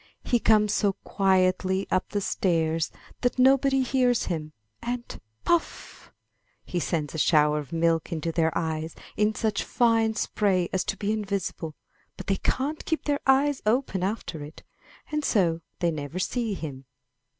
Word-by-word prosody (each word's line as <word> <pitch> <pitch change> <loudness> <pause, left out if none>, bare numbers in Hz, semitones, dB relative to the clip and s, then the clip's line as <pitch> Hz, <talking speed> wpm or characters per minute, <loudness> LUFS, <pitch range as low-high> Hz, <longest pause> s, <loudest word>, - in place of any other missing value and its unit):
He 240 - +2
comes 210 -2 +4
so 205 -2 +2
quietly 190 0 +2
up 185 - +1
the 205 - -1
stairs 165 -4 0 0.3
that 245 +1 +1
nobody 270 +1 +4
hears 250 -2 +2
him; 155 -4 -3 0.3
and, 240 0 -5 0.2
puff! 345 -1 -1 0.5
he 180 - -2
sends 160 -3 -2
a 160 - -3
shower 150 -1 +4
of 145 -3 -8
milk 165 -1 +1
into 165 0 -2
their 160 -1 +2
eyes 160 0 -2 0.2
in 210 +1 +2
such 215 -2 0
fine 225 -2 +2
spray 190 -5 +1
as 190 - +1
to 195 - -2
be 205 +2 -1
invisible; 200 -7 -3 0.4
but - - -7
they 195 - +1
can't 285 +9 -1
keep 320 - -1
their 290 -1 +1
eyes 275 +1 +3
open 225 -4 +1
after 185 -5 -3
it, 150 +2 -11 0.5
and 300 0 -1
so 170 - +2 0.2
they 170 -1 +2
never 150 +2 -5
see 225 +2 -1
him. 135 -6 -7
195 Hz, 155 wpm, -26 LUFS, 165-235 Hz, 0.5 s, comes